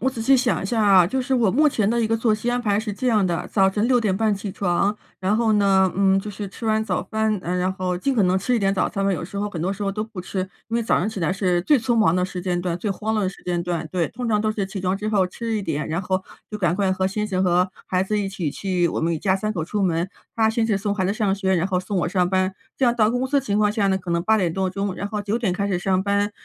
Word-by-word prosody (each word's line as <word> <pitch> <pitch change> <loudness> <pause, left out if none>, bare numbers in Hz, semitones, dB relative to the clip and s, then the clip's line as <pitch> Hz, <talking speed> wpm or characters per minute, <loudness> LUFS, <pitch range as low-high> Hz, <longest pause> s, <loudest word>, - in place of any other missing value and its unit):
我 265 +3 +1
仔 235 - -7
细 265 +4 +4
想 250 -1 +1
一 - - -3
下 225 0 0
啊， 190 -4 +6
就 260 +7 -1
是 265 - -3
我 230 -7 +3
目 300 +4 +4
前 215 -6 0
的 235 +1 +1
一 225 - +1
个 225 - +2
作 225 -1 +2
息 235 +3 -2
安 245 0 0
排 210 -2 +1
是 215 -2 -4
这 255 +6 -4
样 215 -5 +3
的。 175 -1 -1
早 190 -2 +4
晨 210 +3 0
6:30 220 -4 +2
起 200 0 -5
床， 195 +2 0 0.2
然 195 +3 +1
后 225 -2 +2
呢， 195 -2 +4
嗯， 195 0 +3
就 210 - -5
是 205 -1 -6
吃 225 +4 -7
完 220 0 +2
早 185 -4 -1
饭， 220 0 0
然 180 +1 -1
后 185 -1 -2
尽 270 +10 0
可 215 -6 +3
能 180 +1 +2
吃 240 +6 +1
一 - - +1
点 195 -1 +1
早 190 - +1
餐 195 -2 -2
吧， 195 - +2
有 175 - -3
时 200 - -9
候 205 +1 -1
很 165 -5 -5
多 190 - 0
时 200 +1 -4
候 195 - -1
都 210 +1 -2
不 220 -4 -7
吃， 185 +1 -4 0.3
因 230 - -1
为 235 - 0
早 225 - +2
上 200 - 0
起 210 -4 -5
来 165 +2 +1
是 185 -3 +1
最 290 +6 +4
匆 240 +1 0
忙 210 -7 +3
的 180 - +1
时 185 -1 -5
间 180 -1 -1
段、 175 -1 -2
最 200 +3 -3
慌 220 +3 -2
乱 215 - +1
的 190 - +1
时 - - -15
间 175 -1 -1
段， 170 -2 -3
对。 175 -3 0
通 250 -2 -5
常 210 -2 +2
都 215 - 0
是 205 -3 -2
起 195 0 -6
床 185 +1 0
之 210 +2 -4
后 200 -3 +3
吃 225 +4 -4
一 205 - -2
点， 150 -4 -2
然 165 +4 -2
后 185 0 -1 0.3
就 210 - -5
赶 175 -3 +1
快 195 -1 +1
和 190 0 0
先 210 +2 -2
生 190 -3 0
和 180 +1 +2 0.2
孩 185 0 +1
子 210 +2 -1
一 200 - -1
起 185 -6 -3
去， 180 0 0
我 - - -2
们 165 +1 0
一 - - -3
家 190 -1 +2
3 215 +2 -2
口 160 -6 -3
出 205 +4 -3
门。 175 -1 +1 0.3
他 220 -1 +3
先 225 0 0
是 210 -3 +1
送 200 +1 -1
孩 185 -3 0
子 200 - 0
上 205 -4 +1
学， 190 -1 0
然 175 +1 +1
后 185 -2 0
送 190 +2 -4
我 175 - 0
上 180 -1 +1
班。 185 0 +1 0.2
这 265 - +1
样 240 - +3
到 220 -2 +3
公 250 +2 -1
司 285 +1 +2
的 - - +1
情 205 -4 -1
况 210 -1 +3
下 210 -2 +1
呢， 190 -1 +2
可 180 -2 -6
能 170 0 +1
8 220 +4 +3
点 175 -5 0
多 190 0 -1
钟， 195 0 -3
然 200 - -4
后 210 -1 -3
9 205 +3 -1
点 205 -7 0
开 200 +2 -1
始 190 -3 0
上 185 +1 +1
班。 200 +1 +1
200 Hz, 335 characters per minute, -22 LUFS, 185-220 Hz, 0.3 s, 啊